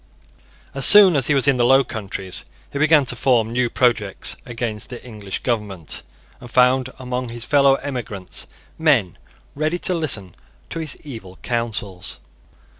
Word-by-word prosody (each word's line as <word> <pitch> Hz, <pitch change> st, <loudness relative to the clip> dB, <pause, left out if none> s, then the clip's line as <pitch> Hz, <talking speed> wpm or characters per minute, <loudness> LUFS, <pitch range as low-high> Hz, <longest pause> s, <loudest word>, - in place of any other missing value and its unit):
As 135 Hz, -, -2 dB
soon 200 Hz, -5 st, +9 dB
as 135 Hz, -4 st, +1 dB
he 150 Hz, -, +2 dB
was 135 Hz, 0 st, +1 dB
in 140 Hz, -2 st, +3 dB
the 120 Hz, -, +2 dB
Low 135 Hz, +3 st, +5 dB
Countries 95 Hz, -5 st, -5 dB, 0.3 s
he 140 Hz, -, -3 dB
began 155 Hz, -2 st, +4 dB
to 125 Hz, -, +1 dB
form 115 Hz, -3 st, +1 dB
new 120 Hz, 0 st, 0 dB
projects 115 Hz, -6 st, +1 dB
against 115 Hz, -3 st, -4 dB
the 125 Hz, -1 st, -10 dB
English 105 Hz, -5 st, -7 dB
government, 105 Hz, -, -3 dB, 0.4 s
and 120 Hz, -, -12 dB
found 125 Hz, +1 st, +3 dB
among 125 Hz, -1 st, -4 dB
his 120 Hz, 0 st, -4 dB
fellow 140 Hz, -2 st, +4 dB
emigrants 120 Hz, -9 st, -4 dB, 0.3 s
men 130 Hz, -, +2 dB, 0.4 s
ready 155 Hz, +4 st, -1 dB
to 185 Hz, -, +2 dB
listen 115 Hz, -, 0 dB, 0.4 s
to 165 Hz, -, -4 dB
his 155 Hz, -4 st, -1 dB
evil 110 Hz, -10 st, -10 dB
counsels. 110 Hz, -6 st, -3 dB
125 Hz, 155 wpm, -20 LUFS, 110-140 Hz, 0.4 s, soon